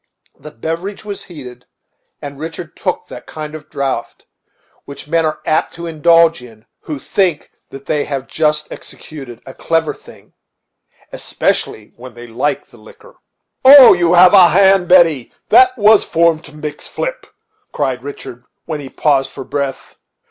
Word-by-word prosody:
The -, -, -11 dB
beverage 165 Hz, -, -6 dB
was 205 Hz, -1 st, -7 dB
heated, 125 Hz, -7 st, -12 dB, 0.6 s
and 140 Hz, -1 st, -8 dB
Richard 160 Hz, +1 st, -8 dB
took -, -, -3 dB
that -, -, -12 dB
kind 155 Hz, -1 st, -8 dB
of 155 Hz, -1 st, -11 dB
draught 130 Hz, -4 st, -4 dB, 0.6 s
which 140 Hz, 0 st, -11 dB
men 165 Hz, 0 st, +1 dB
are 155 Hz, -, -5 dB
apt 155 Hz, -, -1 dB
to 170 Hz, 0 st, -8 dB
indulge 165 Hz, -1 st, +3 dB
in 115 Hz, -3 st, -16 dB
who 150 Hz, -, -7 dB
think 175 Hz, +2 st, -2 dB, 0.2 s
that 135 Hz, 0 st, -12 dB
they 150 Hz, -2 st, -1 dB
have 135 Hz, -2 st, -5 dB
just 150 Hz, -1 st, -1 dB
executed 135 Hz, -6 st, -11 dB
a 130 Hz, -, -11 dB
clever 165 Hz, -1 st, -1 dB
thing, -, -, -18 dB, 0.8 s
especially 105 Hz, -, -3 dB
when 125 Hz, 0 st, -12 dB
they 120 Hz, 0 st, -11 dB
like 130 Hz, +5 st, -3 dB
the 120 Hz, -, -21 dB
liquor. 470 Hz, -, -18 dB, 0.5 s
"Oh! 265 Hz, -1 st, +9 dB
you 175 Hz, -1 st, +1 dB
have 180 Hz, +2 st, +6 dB
a 185 Hz, -3 st, +8 dB
hand. 190 Hz, +1 st, +3 dB
Betty, 165 Hz, -9 st, +3 dB, 0.2 s
that 255 Hz, 0 st, +5 dB
was 215 Hz, -1 st, +5 dB
formed 165 Hz, -1 st, +1 dB
to 150 Hz, -, -13 dB
mix 150 Hz, -1 st, -7 dB
flip," -, -, -5 dB, 0.4 s
cried 130 Hz, -4 st, -3 dB
Richard, 125 Hz, -3 st, -10 dB, 0.2 s
when 155 Hz, -2 st, -5 dB
he 140 Hz, -2 st, -9 dB
paused 135 Hz, -2 st, 0 dB
for 135 Hz, -, -9 dB
breath. 140 Hz, -1 st, -5 dB
155 Hz, 155 wpm, -16 LUFS, 135-170 Hz, 0.8 s, Oh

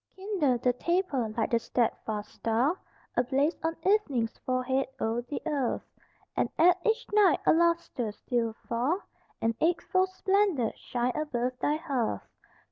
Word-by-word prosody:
Kindle 375 Hz, -, +1 dB
the 250 Hz, +1 st, +1 dB
taper 320 Hz, -, 0 dB
like 220 Hz, -, 0 dB
the 235 Hz, -, +3 dB
steadfast 220 Hz, -3 st, -2 dB
star 235 Hz, +9 st, +1 dB, 0.4 s
Ablaze 270 Hz, +6 st, +2 dB
on 325 Hz, 0 st, 0 dB
evening's 285 Hz, -, +2 dB
forehead 255 Hz, +1 st, 0 dB
o'er 225 Hz, +2 st, 0 dB
the 250 Hz, +4 st, -5 dB
earth, 285 Hz, -6 st, -1 dB, 0.5 s
And -, -, +1 dB
add 355 Hz, +2 st, +6 dB
each 450 Hz, +2 st, +1 dB
night 405 Hz, -6 st, +5 dB
a -, -, +6 dB
lustre 335 Hz, -9 st, +1 dB
till 235 Hz, -2 st, +1 dB
afar 240 Hz, -, -2 dB, 0.4 s
An 225 Hz, 0 st, +2 dB
eightfold 370 Hz, +3 st, +2 dB
splendor 380 Hz, -, +1 dB
shine 245 Hz, 0 st, -2 dB
above 255 Hz, -4 st, -2 dB
thy 295 Hz, -, +1 dB
hearth. 270 Hz, -7 st, -2 dB
270 Hz, 135 wpm, -29 LUFS, 240-345 Hz, 0.5 s, add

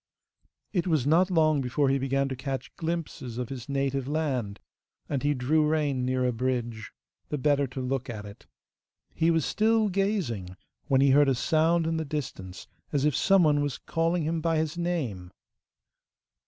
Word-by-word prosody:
It 180 Hz, -2 st, 0 dB
was 155 Hz, -7 st, +1 dB
not 170 Hz, +6 st, +4 dB
long 155 Hz, -5 st, +3 dB
before 135 Hz, +2 st, +1 dB
he 135 Hz, 0 st, +2 dB
began 135 Hz, +1 st, 0 dB
to 130 Hz, -, -3 dB
catch 135 Hz, +1 st, -5 dB
glimpses 160 Hz, -7 st, -4 dB
of 125 Hz, -2 st, -3 dB
his 130 Hz, -1 st, -7 dB
native 135 Hz, -1 st, -1 dB
land, 130 Hz, -9 st, -2 dB, 0.5 s
and 140 Hz, -3 st, -2 dB
he 145 Hz, 0 st, +1 dB
drew 145 Hz, +5 st, +2 dB
rein 150 Hz, -4 st, 0 dB
near 130 Hz, 0 st, 0 dB
a 125 Hz, -, +2 dB
bridge, 120 Hz, -2 st, -3 dB, 0.4 s
the 150 Hz, -, -2 dB
better 145 Hz, 0 st, +2 dB
to 130 Hz, +1 st, -7 dB
look 130 Hz, 0 st, -2 dB
at 105 Hz, -3 st, -6 dB
it. 100 Hz, 0 st, -12 dB, 0.7 s
He 165 Hz, +1 st, +2 dB
was 165 Hz, -3 st, +2 dB
still 220 Hz, 0 st, +2 dB
gazing, 180 Hz, -, -2 dB, 0.3 s
when 135 Hz, -1 st, +3 dB
he 140 Hz, -1 st, +5 dB
heard 145 Hz, +1 st, +5 dB
a 135 Hz, -, +2 dB
sound 160 Hz, +5 st, +2 dB
in 165 Hz, 0 st, 0 dB
the 160 Hz, -, -1 dB
distance 135 Hz, -11 st, -6 dB, 0.3 s
as 145 Hz, -1 st, +1 dB
if 150 Hz, -4 st, +2 dB
some 195 Hz, -2 st, +4 dB
one 145 Hz, -2 st, +3 dB
was 145 Hz, -3 st, -2 dB
calling 165 Hz, +1 st, -1 dB
hit 160 Hz, +1 st, -1 dB
by 165 Hz, 0 st, +1 dB
his 155 Hz, 0 st, -1 dB
name. 145 Hz, -, -3 dB
140 Hz, 180 wpm, -27 LUFS, 130-160 Hz, 0.7 s, he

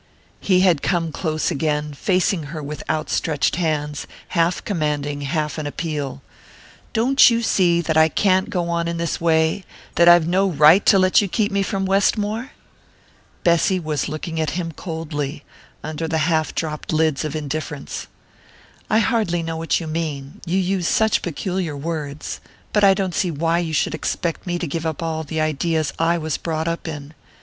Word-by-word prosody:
He 185 Hz, -2 st, +3 dB
had 175 Hz, -6 st, +3 dB
come 170 Hz, -3 st, 0 dB
close 155 Hz, -1 st, -1 dB
again, 150 Hz, 0 st, -1 dB
facing 180 Hz, +1 st, 0 dB
her 155 Hz, -1 st, -6 dB
with 150 Hz, +1 st, -6 dB
outstretched 155 Hz, 0 st, 0 dB
hands, 150 Hz, -4 st, -2 dB, 0.2 s
half 170 Hz, 0 st, 0 dB
commanding, 150 Hz, -5 st, -1 dB
half 150 Hz, +1 st, -2 dB
in 150 Hz, -, -3 dB
appeal. 145 Hz, -3 st, -4 dB, 0.7 s
"Don't 250 Hz, +5 st, +5 dB
you 235 Hz, 0 st, 0 dB
see 175 Hz, -5 st, +3 dB
that 160 Hz, -1 st, -1 dB
I 160 Hz, 0 st, +5 dB
can't 190 Hz, +3 st, +2 dB
go 175 Hz, -2 st, -1 dB
on 170 Hz, 0 st, -1 dB
in 170 Hz, 0 st, -2 dB
this 165 Hz, -1 st, -2 dB
way 160 Hz, +2 st, +2 dB, 0.3 s
that 170 Hz, 0 st, +7 dB
I've 175 Hz, -2 st, +6 dB
no 190 Hz, +3 st, +2 dB
right 155 Hz, +4 st, +6 dB
to 200 Hz, -, +7 dB
let 185 Hz, +1 st, +4 dB
you 205 Hz, -, -1 dB
keep 205 Hz, +2 st, 0 dB
me 200 Hz, 0 st, +1 dB
from 195 Hz, 0 st, -1 dB
Westmore?" 210 Hz, +5 st, +1 dB, 0.9 s
Bessy 170 Hz, +2 st, +3 dB
was 155 Hz, -4 st, -2 dB
looking 160 Hz, +2 st, -4 dB
at 155 Hz, +1 st, -2 dB
him 170 Hz, -2 st, -3 dB
coldly, 150 Hz, -3 st, -5 dB, 0.4 s
under 155 Hz, +1 st, -4 dB
the 160 Hz, 0 st, 0 dB
half 160 Hz, -2 st, 0 dB
dropped 155 Hz, -2 st, -3 dB
lids 155 Hz, -3 st, +1 dB
of 155 Hz, 0 st, -4 dB
indifference. 150 Hz, -1 st, -5 dB, 0.8 s
"I 215 Hz, -, +3 dB
hardly 220 Hz, -8 st, +1 dB
know 165 Hz, 0 st, -4 dB
what 165 Hz, 0 st, 0 dB
you 170 Hz, -, -6 dB
mean 155 Hz, -4 st, -4 dB
you 180 Hz, +3 st, +1 dB
use 185 Hz, -2 st, 0 dB
such 220 Hz, -1 st, +2 dB
peculiar 175 Hz, -2 st, -3 dB
words; 150 Hz, -1 st, -5 dB, 0.3 s
but 210 Hz, -, +3 dB
I 195 Hz, -1 st, +7 dB
don't 190 Hz, -2 st, -2 dB
see 180 Hz, -, 0 dB
why 165 Hz, +2 st, 0 dB
you 165 Hz, -2 st, -3 dB
should 145 Hz, -, +1 dB
expect 170 Hz, +1 st, -3 dB
me 175 Hz, 0 st, -1 dB
to 175 Hz, -, -3 dB
give 165 Hz, +2 st, -3 dB
up 160 Hz, 0 st, -3 dB
all 160 Hz, -1 st, -2 dB
the 160 Hz, +1 st, -4 dB
ideas 155 Hz, -1 st, 0 dB
I 165 Hz, +1 st, +2 dB
was 160 Hz, -2 st, -2 dB
brought 160 Hz, -1 st, -3 dB
up 170 Hz, 0 st, -3 dB
in. 150 Hz, -1 st, -7 dB
165 Hz, 175 wpm, -21 LUFS, 155-180 Hz, 0.9 s, that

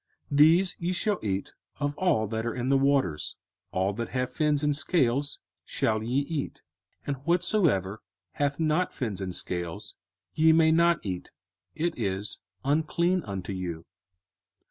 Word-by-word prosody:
05:014:009 140 Hz, -, 0 dB
These 170 Hz, +5 st, +6 dB
ye 175 Hz, +2 st, -1 dB
shall 205 Hz, +2 st, 0 dB
eat 100 Hz, -2 st, -2 dB, 0.3 s
of 145 Hz, 0 st, -1 dB
all 175 Hz, -13 st, +2 dB
that 110 Hz, +1 st, -3 dB
are 115 Hz, 0 st, -2 dB
in 125 Hz, +1 st, -2 dB
the 135 Hz, -, +5 dB
waters: 135 Hz, -, +1 dB, 0.3 s
all 95 Hz, +2 st, 0 dB
that 115 Hz, +3 st, -4 dB
have 125 Hz, -1 st, -2 dB
fins 150 Hz, -2 st, +1 dB
and 150 Hz, -1 st, +2 dB
scales 140 Hz, -2 st, +1 dB, 0.2 s
shall 110 Hz, -1 st, 0 dB
ye 125 Hz, +5 st, 0 dB
eat: 145 Hz, 0 st, -4 dB, 0.4 s
05:014:010 -, -, -35 dB
And 140 Hz, -1 st, -2 dB
whatsoever 170 Hz, -, +2 dB, 0.3 s
hath 145 Hz, -, -1 dB
not 160 Hz, +3 st, +1 dB
fins 105 Hz, -8 st, -4 dB
and 95 Hz, -2 st, -3 dB
scales 85 Hz, -2 st, -4 dB, 0.4 s
ye 160 Hz, +1 st, +5 dB
may 160 Hz, 0 st, +5 dB
not 170 Hz, -2 st, +3 dB
eat; 90 Hz, -2 st, -4 dB, 0.5 s
it 165 Hz, +2 st, 0 dB
is 95 Hz, +1 st, -2 dB, 0.2 s
unclean 165 Hz, +5 st, +2 dB
unto 95 Hz, -2 st, -4 dB
you. 85 Hz, -3 st, -5 dB
140 Hz, 155 wpm, -28 LUFS, 100-160 Hz, 0.5 s, These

